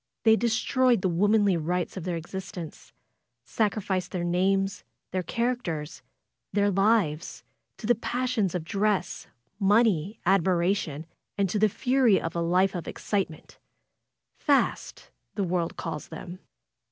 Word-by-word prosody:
They 220 0 +6
destroyed 240 0 +2
the 190 - +2
womanly 205 +2 +3
rights 175 +2 -2
of 185 -3 -6
their 175 -2 -1
exist 190 +4 -7
ence, 165 -3 -8 0.5
sacriflced 200 -4 -1
their 180 -2 -3
names, 195 +2 +1 0.3
their 185 - -1
characters, 180 -9 -3 0.5
their 205 0 +2
lives, 195 -5 +1 0.3
to - - -8
the 240 - +5
passions 240 -4 -1
of 175 - -2
dress, 200 +3 -1 0.3
money, 205 -2 +2
admiration, 175 -4 +1 0.3
and 200 -1 +2
to 210 - 0
the 215 +1 +4
fury 250 -2 +3
of 165 - -5
a 170 - 0
life 180 +3 +2
of 175 -4 -5
excitement 190 -7 -4 0.4
— - - -47
'Tast^' - - +1 0.2
the 200 - 0
world 175 -2 -1
calls 165 -4 -5
them. 175 +3 -9
195 Hz, 135 wpm, -27 LUFS, 175-215 Hz, 0.5 s, They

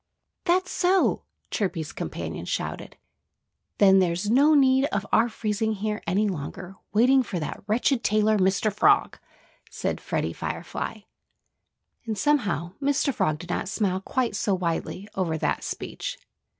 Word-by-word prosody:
"That's 370 +1 +2
so!" 370 +1 +2 0.3
Chirpy's 175 -7 -2
companions - - -5
shouted. - - -4 0.8
"Then 195 -1 +6
there's 180 +3 0
no 290 +5 +5
need 265 -1 +5
of 205 -7 -2
our 230 +2 +4
freezing 220 0 -1
here 210 +1 -3
any 200 +5 +2
longer, 180 +2 -5 0.2
waiting 255 +5 +5
for 200 -7 -4
that 150 - -5
wretched 240 +3 +1
tailor, 215 0 +3
Mr. 190 +2 +2
Frog!" 405 - +3 0.5
said - - -3
Freddie - - -2
Firefly. - - -5 1.1
And 220 -2 -2
somehow, 200 - +1
Mr. 275 0 +1
Frog 155 -8 0
did 175 +2 -8
not 185 - -2
smile 190 -3 0
quite 250 +4 -1
so 200 - +1
widely 180 +2 -3
over 170 -4 -1
that - - -1
speech. - - -5
210 Hz, 135 wpm, -25 LUFS, 185-260 Hz, 1.1 s, Then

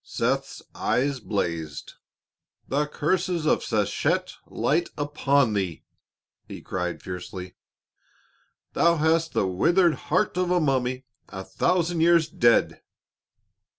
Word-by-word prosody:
Seth's - - -2
eyes 135 +1 0
blazed. 85 -9 -4 0.7
"The 145 +2 0
curses 170 +2 -1
of - - +2
Sechet 140 - 0
light 170 - 0
upon 140 -4 +1
thee!" 95 -5 -3 0.6
he - - -8
cried 90 -1 -4
fiercely; 90 0 -7 1.2
"thou 170 0 +3
hast 160 +1 +1
the - - +1
withered 170 - +3 0.2
heart 180 +3 +1
of 180 -1 0
a 180 0 +3
mummy 130 -3 0 0.2
a 95 0 -7
thousand 175 - 0
years 170 -1 +4
dead!" 135 -10 +2
145 Hz, 110 wpm, -25 LUFS, 100-170 Hz, 1.2 s, years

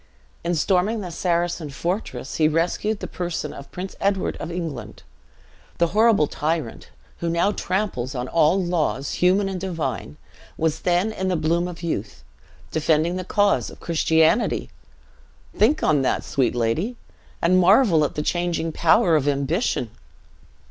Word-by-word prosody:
In 170 +1 0
storming 195 +6 +1
a 180 - -6
Saracen 170 -2 -1
fortress, 140 - -4
he 155 - +4
rescued 175 +7 0
the - - -4
person 175 -4 -4
of 140 - -10
Prince 185 +2 -6
Edward 195 -1 0
of - - -6
England. 165 -7 -6 0.7
The 170 -1 +2
horrible 215 -3 +4
tyrant, 150 -4 -3 0.3
who 170 - -2
now 170 +4 +2
tramples 185 - -2
on 125 0 -3
all 165 +5 +3
laws, 165 -6 -1
human 190 +3 +2
and 190 -2 -4
divine, 135 - -4 0.4
was 160 -1 0
then 180 +4 +1
in 190 -3 -3
the 185 - +1
bloom 170 +2 +1
of 175 -1 -9
youth, 115 -11 -4 0.5
defending 160 +2 +1
the 185 - -3
cause 200 - +1
of - - -13
Christianity! 160 +4 +2 0.8
Think 245 +9 +3
on 150 -3 +3
that, 130 - 0
sweet 125 -3 0
lady, 135 - 0 0.4
and 185 +2 +3
marvel 185 - +5
at 145 - -2
the 150 - -2
changing 175 -1 -1
power 170 +3 +4
of 145 -2 +1
ambition! 140 - 0
170 Hz, 150 wpm, -23 LUFS, 150-185 Hz, 0.8 s, marvel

